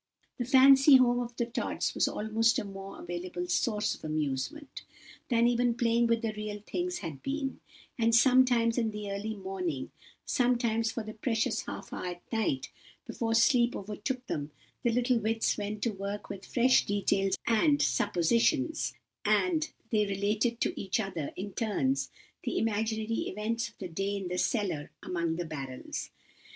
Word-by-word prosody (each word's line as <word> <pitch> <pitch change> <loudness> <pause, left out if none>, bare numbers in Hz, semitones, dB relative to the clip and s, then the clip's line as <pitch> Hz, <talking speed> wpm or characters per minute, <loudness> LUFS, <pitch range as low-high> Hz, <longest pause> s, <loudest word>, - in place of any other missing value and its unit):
The 245 - -1
fancy 270 +2 +7
home 245 -1 +5
of 240 -1 -4
the 235 - 0
Tods 235 - -2
was - - +2
almost 225 +2 +1
a - - -1
more 195 -1 -8
available 175 +1 -5
source 210 +3 +1
of - - -12
amusement, 155 - -3 0.5
than 235 -1 +4
even 240 0 +2
playing 235 0 +3
with 230 0 +1
the 220 -1 -1
real 210 -1 -5
things 355 0 -2
had 145 -5 -6
been; 275 -1 -3 0.4
and 230 0 +4
sometimes 245 -1 +5
in 225 -2 +1
the 210 -1 -5
early 210 +2 -3
morning, 185 -8 -4 0.3
sometimes 235 -3 +1
for 230 - -4
the 215 0 -7
precious 225 0 -1
half - - -7
hour - - -4
at 175 - -18
night, 200 -12 0 0.3
before 225 -1 -1
sleep 240 0 +4
overtook 215 +6 -4
them, 145 -8 -3 0.3
the 240 - +2
little 245 +1 +2
wits 225 +1 +1
went 210 0 -4
to 235 - +1
work 200 +1 -5
with 195 0 -7
fresh 255 +1 +4
details 195 -1 +1
and 285 +6 +3
suppositions, 235 - +1 0.3
and 320 -4 +2 0.2
they 210 -2 +2
related 210 +4 0
to - - +1
each 195 +3 -1
other, 185 -8 -3
in 200 +1 -6
turns, 255 +5 0 0.3
the - - -2
imaginary 220 0 -1
events 225 +3 -2
of - - -26
the 190 - -5
day 195 +4 -2
in 190 -2 -4
the 180 0 -2
cellar 190 - -1
among 170 -2 -1
the 175 +1 -3
barrels. 135 -5 -6
220 Hz, 165 wpm, -30 LUFS, 195-240 Hz, 0.5 s, fancy